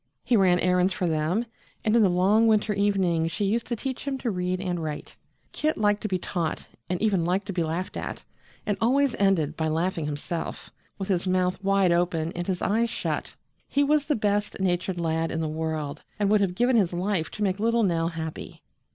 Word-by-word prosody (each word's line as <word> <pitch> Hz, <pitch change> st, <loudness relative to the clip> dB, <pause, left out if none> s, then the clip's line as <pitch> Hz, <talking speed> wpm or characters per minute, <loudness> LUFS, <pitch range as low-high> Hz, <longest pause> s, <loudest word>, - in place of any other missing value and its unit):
He 245 Hz, -, +2 dB
ran 185 Hz, -4 st, +5 dB
errands 180 Hz, +1 st, +2 dB
for 185 Hz, -, -2 dB
them, 165 Hz, +7 st, 0 dB, 0.4 s
and 215 Hz, +1 st, +3 dB
in 235 Hz, -, +5 dB
the 200 Hz, -, +5 dB
long 195 Hz, +6 st, +4 dB
winter 215 Hz, -1 st, +3 dB
evenings 190 Hz, -5 st, +1 dB
she 200 Hz, +4 st, -1 dB
used 225 Hz, +4 st, 0 dB
to 240 Hz, -, -1 dB
teach 265 Hz, +4 st, -5 dB
him 275 Hz, -1 st, -1 dB
to 245 Hz, -3 st, -2 dB
read 180 Hz, -1 st, -1 dB
and 180 Hz, -3 st, -2 dB
write. 155 Hz, -2 st, -5 dB, 0.4 s
Kit 310 Hz, +1 st, -1 dB
liked 205 Hz, -1 st, +2 dB
to -, -, -2 dB
be 190 Hz, -3 st, 0 dB
taught 175 Hz, -2 st, -3 dB, 0.2 s
and 180 Hz, -1 st, -1 dB
even 195 Hz, -6 st, +2 dB
liked 185 Hz, +3 st, 0 dB
to 200 Hz, -, -4 dB
be 175 Hz, -, 0 dB
laughed 165 Hz, +3 st, -3 dB
at, -, -, -5 dB, 0.4 s
and 205 Hz, -, -1 dB
always 265 Hz, +3 st, +3 dB
ended 170 Hz, -7 st, +2 dB
by 160 Hz, 0 st, -1 dB
laughing 165 Hz, 0 st, -1 dB
himself, 150 Hz, +3 st, -5 dB, 0.3 s
with 195 Hz, 0 st, -5 dB
his 185 Hz, -1 st, 0 dB
mouth 185 Hz, +1 st, 0 dB
wide 195 Hz, -2 st, +3 dB
open 170 Hz, -2 st, +1 dB
and 175 Hz, 0 st, -5 dB
his 185 Hz, -2 st, -2 dB
eyes 230 Hz, +3 st, +2 dB
shut. -, -, -3 dB, 0.3 s
He 285 Hz, -, +2 dB
was 295 Hz, 0 st, +2 dB
the 295 Hz, -, +2 dB
best 205 Hz, -1 st, 0 dB
natured 180 Hz, -1 st, 0 dB
lad 165 Hz, -1 st, 0 dB
in -, -, -2 dB
the 160 Hz, -, -1 dB
world, 155 Hz, -2 st, -3 dB, 0.2 s
and 205 Hz, -1 st, +1 dB
would 210 Hz, -1 st, +4 dB
have 185 Hz, -3 st, 0 dB
given 245 Hz, +3 st, +3 dB
his 185 Hz, -5 st, +2 dB
life 180 Hz, -2 st, -1 dB
to 210 Hz, -, -4 dB
make 190 Hz, -1 st, 0 dB
little 230 Hz, +1 st, +2 dB
Nell 165 Hz, -4 st, +1 dB
happy. 160 Hz, -2 st, -6 dB
185 Hz, 210 wpm, -26 LUFS, 170-210 Hz, 0.4 s, ran